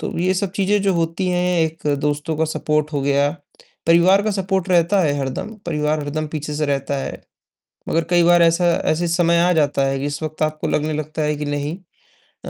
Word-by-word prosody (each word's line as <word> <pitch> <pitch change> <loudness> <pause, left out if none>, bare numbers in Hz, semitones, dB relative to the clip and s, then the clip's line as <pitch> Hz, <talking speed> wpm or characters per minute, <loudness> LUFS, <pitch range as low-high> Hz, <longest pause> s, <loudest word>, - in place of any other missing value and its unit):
तो - - -5
ये 185 +2 +1
सब 195 0 -1
चीज़ें 200 +1 +1
जो 195 -1 +2
होती 165 +2 -1
हैं, 180 0 +1
एक 160 -1 -2
दोस्तों 150 +2 -1
का 160 - +1
सपोर्ट 150 -1 -1
हो 145 - -1
गया, 140 +1 +2 0.6
परिवार 175 +4 +5
का 215 - 0
सपोर्ट 190 -1 -1
रहता 180 +2 +3
है 150 -4 +2
हरदम, 135 +10 -4
परिवार 150 -2 0
हरदम 150 +2 -3
पीछे 150 -1 -5
से 150 0 -1
रहता 140 0 -1
है, - - -6 0.7
मगर 165 0 +1
कई 175 -1 +4
बार 175 0 +5
ऐसा 170 +1 +3 0.3
ऐसे 170 +2 0
समय 170 0 +2
आ 180 +1 +3
जाता 145 -3 +1
है 135 0 -1
कि 140 - -3
इस 145 +1 -4
वक़्त 155 0 -6
आपको 155 0 -2
लगने 150 +1 -1
लगता 155 +1 -4
है 150 0 0
कि 150 - -4
नहीं 145 +2 -3 0.7
अ, - - -5
160 Hz, 210 wpm, -20 LUFS, 150-175 Hz, 0.7 s, परिवार